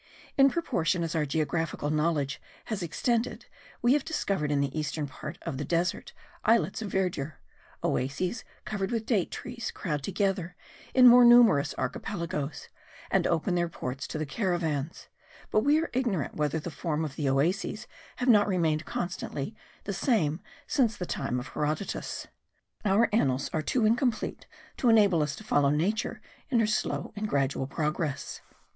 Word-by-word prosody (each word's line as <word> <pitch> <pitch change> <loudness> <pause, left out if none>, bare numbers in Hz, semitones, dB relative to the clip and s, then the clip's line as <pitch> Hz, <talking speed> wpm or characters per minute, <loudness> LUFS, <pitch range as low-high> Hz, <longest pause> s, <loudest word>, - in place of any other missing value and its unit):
In 275 0 +6
proportion 195 - 0
as 165 - -2
our 155 -3 0
geographical 155 0 -1
knowledge 150 -2 0 0.2
has 215 -3 -3
extended 230 +8 -1 0.4
we 240 +2 +5
have 290 -1 +2
discovered 195 - -1
in 145 - +2
the 140 0 -1
eastern 150 0 -2
part 140 - -8
of 130 - -4
the - - -1
desert 170 +4 -1 0.3
islets 220 -4 +2
of 205 -4 -4
verdure; 170 -6 -1 0.5
oases 160 - -1 0.2
covered 195 -3 -2
with 230 -2 -2
date 215 -7 +1
trees 235 -2 -5
crowd 150 -7 -3
together 190 0 -1 0.4
in 255 -1 +8
more 245 +1 +9
numerous 240 -12 +6
archipelagos, 170 -6 -3 0.4
and - - +3
open 170 +2 +1
their 175 -1 +1
ports 130 -4 -5
to - - -4
the 155 - -2
caravans; 165 -3 -2 0.4
but - - +4
we 290 +7 +4
are 330 - -3
ignorant 235 - 0
whether 150 +1 0
the 165 +2 -6
form 160 0 -2
of 145 -2 -6
the 145 -3 0
oases 180 - 0 0.3
have 250 - -3
not 210 -4 +6
remained 165 -5 +1
constantly 175 +1 -4 0.3
the 200 - -3
same 180 - +1 0.2
since 230 -7 +1
the 180 - -3
time 125 -6 -2
of 125 - -7
Herodotus. 150 +5 -3 0.6
Our 210 +3 +4
annals 135 - +1
are 155 - +1
too 225 +8 +1
incomplete 230 +1 0 0.3
to 245 - +2
enable 205 -7 +5
us 150 -1 -1
to - - -11
follow 145 -9 +3
Nature 180 +10 -1 0.3
in 245 -4 +3
her 225 - +4
slow 215 0 -1
and 210 0 -3
gradual 135 -3 0
progress. 150 0 -2
175 Hz, 160 wpm, -28 LUFS, 150-220 Hz, 0.6 s, more